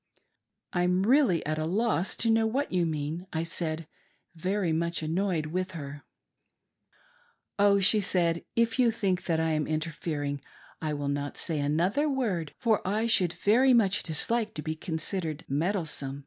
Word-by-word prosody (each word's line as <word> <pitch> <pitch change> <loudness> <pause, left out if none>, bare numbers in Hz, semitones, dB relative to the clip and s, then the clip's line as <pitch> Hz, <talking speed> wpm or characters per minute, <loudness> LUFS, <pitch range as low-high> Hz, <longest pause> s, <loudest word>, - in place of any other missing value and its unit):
" - - -58 0.3
I'm 180 +1 +2
really 240 - +3
at 155 +1 -1
a 155 - -1
loss 195 +1 0
to 230 - +1
know 225 0 +3
what 270 +6 -1
you 180 -2 +1
mean," 155 +3 -3
I 160 0 -1
said, 165 -1 -3 0.5
very 185 +1 -1
much 170 +1 -1
annoyed 170 0 0
with 185 +4 -3
her. 145 -2 -7 0.8
" - - -32
Oh," 200 0 +5
she 200 +3 +4
said, 170 -4 +1
" - - -52
If 230 +1 +1
you 245 -2 +5
think 195 -5 -1
that 165 -2 +1
I 160 0 +1
am 155 -1 0
interfering, 155 -2 -3 0.4
I 155 -2 -2
will 145 -1 -3
not 145 0 -3
say 160 -3 -1
another 175 - +1
word, 205 - -2
for 225 -4 +2
I 210 +4 0
should 185 -7 +3
very 250 +5 +4
much 205 -3 +3
dislike 215 +8 0
to 150 - -5
be 155 0 -3
considered 160 -1 -3
meddlesome. 150 -3 -2
175 Hz, 170 wpm, -28 LUFS, 155-210 Hz, 0.8 s, Oh